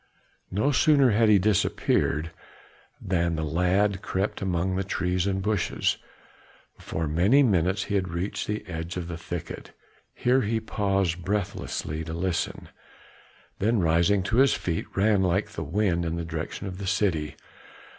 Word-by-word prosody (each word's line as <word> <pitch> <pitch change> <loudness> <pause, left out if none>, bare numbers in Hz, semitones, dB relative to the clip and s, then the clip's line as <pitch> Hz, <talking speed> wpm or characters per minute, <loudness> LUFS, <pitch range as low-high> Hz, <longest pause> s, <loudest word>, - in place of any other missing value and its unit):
No 105 +10 +1
sooner 140 -3 +4
had 110 +1 +4
he 105 - +7
disappeared, 85 -5 +1 0.7
than 85 -2 0
the 80 - -2
lad 90 +5 +1
crept 95 +3 -2
away 95 - -1
among 90 +1 0
the 95 - 0
trees 90 -1 -1
and 95 -1 -1
bushes; 105 -3 0 0.8
before 80 0 -4
many 95 - +4
minutes 95 -3 +2
he - - -5
had 95 -2 +1
reached 85 +4 -3
the 105 0 -3
edge 85 0 -5
of 85 -2 -4
the 85 - -5
thicket, 85 0 -7 0.4
here 130 +2 +2
he 110 +1 0
paused 95 -5 -1
breathlessly 90 -5 -3
to 80 - -6
listen, 85 0 -2 0.9
then 110 +4 +2
rising 85 +3 +3
to 110 +5 -1
his 135 0 +5
feet, 85 -2 -3
ran 100 0 +3
like 95 +3 +1
the 80 -6 -5
wind 85 +2 0
in 85 0 -2
the 85 -1 -3
direction 80 +3 -5
of 95 -1 -6
the 100 - -5
city. 90 -7 0
95 Hz, 155 wpm, -26 LUFS, 85-105 Hz, 0.9 s, he